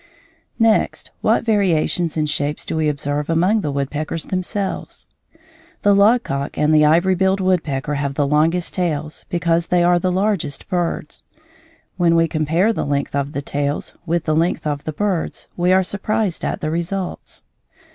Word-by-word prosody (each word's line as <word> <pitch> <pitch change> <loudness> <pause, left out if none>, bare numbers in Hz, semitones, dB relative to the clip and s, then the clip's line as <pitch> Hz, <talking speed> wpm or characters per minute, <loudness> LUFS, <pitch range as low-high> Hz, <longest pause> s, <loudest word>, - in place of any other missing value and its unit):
Next, 225 -2 +1
what - - +2
variations 175 -6 +1
in 155 - +1
shapes 150 0 -2
do - - -3
we 155 -1 +1
observe 145 +1 -2
among 180 +7 +2
the 150 - -2
woodpeckers 145 +3 -3
themselves? 190 +1 -3 0.8
The 205 - +5
logcock 200 - +2
and 150 +1 +3
the 155 0 +6
ivory 170 +5 +4
billed 190 +1 +1
woodpecker 160 -7 0
have 140 -1 -2
the 145 - +1
longest 160 +5 +1
tails 155 -4 -2
because 170 -1 +1
they 175 -1 +2
are 175 0 +4
the 185 +1 0
largest 190 -7 -1
birds. 175 -4 -2 0.7
When 170 -2 +3
we 165 0 +4
compare 165 +8 +1
the - - -2
length 140 0 -2
of 140 +1 -2
the 140 - -3
tails 145 0 -2
with 170 0 0
the 155 -1 0
length 165 +1 0
of 145 -1 -2
the 155 - -2
birds 190 +1 -2
we 175 +1 +2
are 190 0 +4
surprised 205 0 -1
at - - -2
the 155 - -2
results. 175 +3 -4
165 Hz, 165 wpm, -20 LUFS, 150-185 Hz, 0.8 s, the